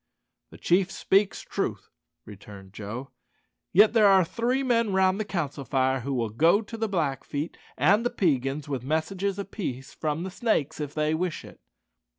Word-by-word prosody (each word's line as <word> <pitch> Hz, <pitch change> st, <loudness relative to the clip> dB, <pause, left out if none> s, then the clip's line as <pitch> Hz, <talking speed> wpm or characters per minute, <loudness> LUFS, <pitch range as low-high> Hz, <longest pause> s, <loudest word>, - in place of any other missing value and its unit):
"The -, -, -13 dB
chief 180 Hz, +2 st, +2 dB
speaks 195 Hz, +1 st, +1 dB
truth," -, -, -4 dB, 0.3 s
returned 100 Hz, -2 st, -12 dB
Joe; 110 Hz, +6 st, -7 dB, 0.6 s
"yet 210 Hz, +5 st, +6 dB
there 220 Hz, -3 st, +6 dB
are 190 Hz, -2 st, +5 dB
three 245 Hz, +8 st, -1 dB
men 230 Hz, -4 st, +2 dB
round 190 Hz, +1 st, +3 dB
the 215 Hz, -, -1 dB
council 150 Hz, -8 st, -3 dB
fire 130 Hz, 0 st, +1 dB
who 135 Hz, +2 st, -3 dB
will 115 Hz, -3 st, -1 dB
go 165 Hz, -, +3 dB
to 225 Hz, -, -9 dB
the 225 Hz, -1 st, -2 dB
Blackfeet 150 Hz, -3 st, -2 dB, 0.2 s
and 195 Hz, -, +4 dB
the 240 Hz, -, +1 dB
Peigans 140 Hz, -, 0 dB
with 135 Hz, -4 st, -3 dB
messages 180 Hz, +7 st, -1 dB
of 200 Hz, -1 st, -6 dB
peace 135 Hz, -, -5 dB
from 155 Hz, +1 st, -2 dB
the 190 Hz, -, -5 dB
Snakes 180 Hz, -, -1 dB
if 145 Hz, -2 st, -5 dB
they 155 Hz, 0 st, +1 dB
wish 175 Hz, +1 st, -2 dB
it." -, -, -14 dB
165 Hz, 170 wpm, -26 LUFS, 135-200 Hz, 0.6 s, yet